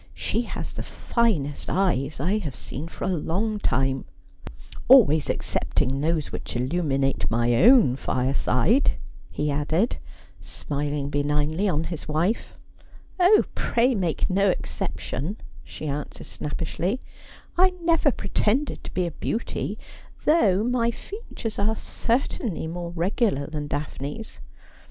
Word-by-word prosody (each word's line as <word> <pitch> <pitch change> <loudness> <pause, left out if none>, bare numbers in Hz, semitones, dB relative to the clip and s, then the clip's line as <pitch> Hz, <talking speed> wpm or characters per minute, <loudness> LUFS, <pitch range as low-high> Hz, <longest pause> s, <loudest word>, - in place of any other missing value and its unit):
She 230 - 0
has 240 - -5
the - - -5
finest 180 - -1
eyes 155 -8 +1
I 185 +9 +1
have 150 -10 -5
seen 150 +6 -6
for - - -8
a - - 0
long 205 +7 -1
time 135 -6 0 0.4
— - - -14
always 195 - +7
excepting 135 +2 0
those 160 -1 0
which - - -6
illuminate 135 0 0
my 120 +1 +2
own 235 - +7
fireside,' 130 - +2 0.4
he 150 0 -1
added, 155 +10 +1 0.4
smiling 145 -1 -3
benignly 150 +6 +1
on 160 -3 +1
his 165 -1 -5
wife. 170 +9 0 0.3
' - - -29 0.3
Oh, 370 +4 +6
pray 245 +3 +2
make 180 -7 0
no 195 +1 +3
exception,' 180 - -3 0.3
she - - -8
answered 145 0 -4
snappishly. 170 +8 -3 0.3
' - - -19
I 370 +2 +6
never 330 -3 +4
pretended 225 +6 0
to - - -7
be 180 - +1
a 170 - -3
beauty; 225 +8 -3 0.5
though 215 - +4
my 240 -1 +2
features 235 - -6
are 215 +2 +2
cer 230 +1 0
tainly 190 -8 -4
more 170 +1 -4
regular 175 - 0
than 150 -1 -4
Daphne's. 145 +7 -5
170 Hz, 135 wpm, -25 LUFS, 145-220 Hz, 0.5 s, always